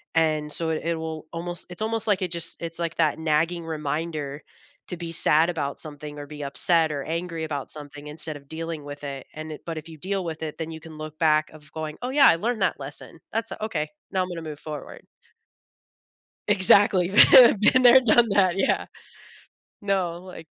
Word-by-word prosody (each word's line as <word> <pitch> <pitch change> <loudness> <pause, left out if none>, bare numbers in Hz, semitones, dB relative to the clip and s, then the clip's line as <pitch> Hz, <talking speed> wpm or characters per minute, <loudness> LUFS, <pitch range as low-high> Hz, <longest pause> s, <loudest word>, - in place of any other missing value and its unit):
and 155 -2 +1
so 165 +1 -2
it 160 - -1
it 170 0 0
will 160 -1 -6
almost 175 +1 -5
it's 175 +3 -7
almost 225 0 -1
like 200 -2 +2
it 180 -2 -2
just 170 0 -5
it's 165 0 -4
like 170 -1 -3
that 160 -2 +1
nagging 165 +2 0
reminder 150 -1 -4 0.4
to 180 - -4
be 170 -1 -6
sad 160 +1 +4
about 145 -5 -3
something 150 -1 -8
or 145 - -7
be 150 0 -9
upset 160 +3 +1
or 140 -1 -4
angry 165 0 -4
about 145 -3 -5
something 145 0 -9
instead 150 0 -6
of 140 -1 -18
dealing 160 -1 -5
with 145 0 -9
it, 140 -2 -6
and 155 0 -7
it - - -10
but 165 -2 -5
if 160 +1 -8
you 160 - -11
deal 190 +3 -3
with 160 -1 -5
it, 155 - -5
then 160 0 -4
you 160 - -8
can 160 -2 -12
look 155 0 -8
back 155 -1 +3
of 150 -1 -16
going, 155 -1 -5
"Oh, 250 - -3
yeah. 280 -1 +6
I - - +5
learned 225 +2 -2
that 180 - 0
lesson, 145 +3 -9
that's 225 0 -2
okay; 155 -8 -2 0.2
now 190 -1 +1
I'm 180 - -6
gonna 170 -2 -6
move 150 -2 -7
forward." 150 -2 -8 1.5
Exactly. 190 -2 +6 0.2
Been 240 -5 +8
been 255 +4 +4
there, 250 +1 +8
done 235 -1 +4
that. 190 -2 +3
Yeah. 195 - +1 1.0
No, 185 -4 -1
like 180 -3 -11
160 Hz, 205 wpm, -25 LUFS, 150-180 Hz, 1.5 s, Been